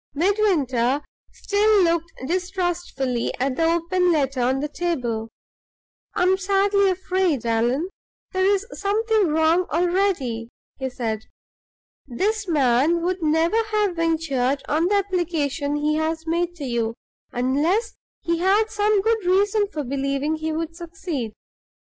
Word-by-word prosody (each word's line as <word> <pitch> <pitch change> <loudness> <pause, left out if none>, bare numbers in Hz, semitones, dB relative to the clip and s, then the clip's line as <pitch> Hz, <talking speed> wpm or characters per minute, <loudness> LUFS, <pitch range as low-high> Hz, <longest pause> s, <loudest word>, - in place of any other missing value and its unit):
Midwinter 295 - +1 0.3
still 415 -1 +2
looked 335 -1 +1
distrustfully 350 -8 -2
at 260 0 0
the 325 - +1
open 340 +2 +2
letter 275 -5 0
on 260 +2 +1
the 295 - -2
table. 250 -9 -2 0.9
"I - - +2
am 375 +1 +3
sadly 395 +1 +2
afraid, 370 -7 0
Allan, 240 +8 +1 0.4
there 375 -1 0
is 395 +1 +2
something 430 0 +1
wrong 320 +3 +2
already," 335 - 0 0.3
he 265 -1 -2
said. 225 -4 -3 0.8
"This 405 - -1
man 295 +2 +2
would 365 +1 -1
never 325 +7 +2
have 415 -4 +1
ventured 285 -5 0
on 320 +4 +1
the 410 - +2
application 330 -7 -1
he 300 +1 0
has 320 +1 -2
made 340 +1 -1
to 315 - -8
you, 230 -2 -1 0.4
unless 300 - +1 0.3
he 335 0 -1
had 405 +5 +2
some 420 -1 +2
good 450 -1 +1
reason 405 +3 +2
for 310 -7 -4
believing 275 +3 -1
he 315 0 -3
would 330 +1 -3
succeed. 330 - -5
330 Hz, 130 wpm, -23 LUFS, 275-380 Hz, 0.9 s, am